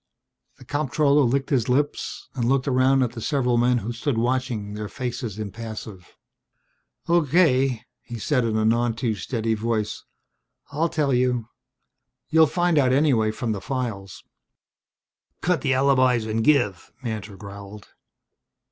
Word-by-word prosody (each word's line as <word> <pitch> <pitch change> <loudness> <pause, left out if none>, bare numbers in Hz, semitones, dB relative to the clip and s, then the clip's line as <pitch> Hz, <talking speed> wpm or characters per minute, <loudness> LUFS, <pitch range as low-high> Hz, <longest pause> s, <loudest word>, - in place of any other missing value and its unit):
The 130 - -15
comptroller 145 +1 +2
licked 135 +2 0
his 125 -3 +1
lips 145 +3 -1
and 120 -3 -1
looked 135 +1 +1
around 130 0 +3
at 120 - -1
the 120 -2 -8
several 125 -2 +1
men 125 +1 +3
who 120 - -3
stood 120 +2 -2
watching, 120 -3 -1
their 105 0 -5
faces 120 -5 -5
impassive. 110 -3 -8 0.9
"Okay," 140 -7 +3 0.2
he 120 - -8
said 125 +3 0
in 110 -1 0
a 110 - +1
none 115 +1 +2
too 115 -1 -1
steady 110 +3 -2
voice. 110 -1 -2 0.7
"I'll 160 +4 0
tell 145 -4 0
you. 125 -2 +1 0.8
You'd 160 0 +5
find 175 -3 +2
out 130 -3 +3
anyway 130 -6 +3
from 110 +1 -3
the 100 -3 -3
files." 115 -8 -5 1.2
"Cut 180 -5 +1
the 135 -2 +1
alibis 130 -3 +3
and 110 +1 -1
give," 120 -10 +1
Mantor 105 -4 -5
growled. 100 0 -10
125 Hz, 140 wpm, -24 LUFS, 110-135 Hz, 1.2 s, You'd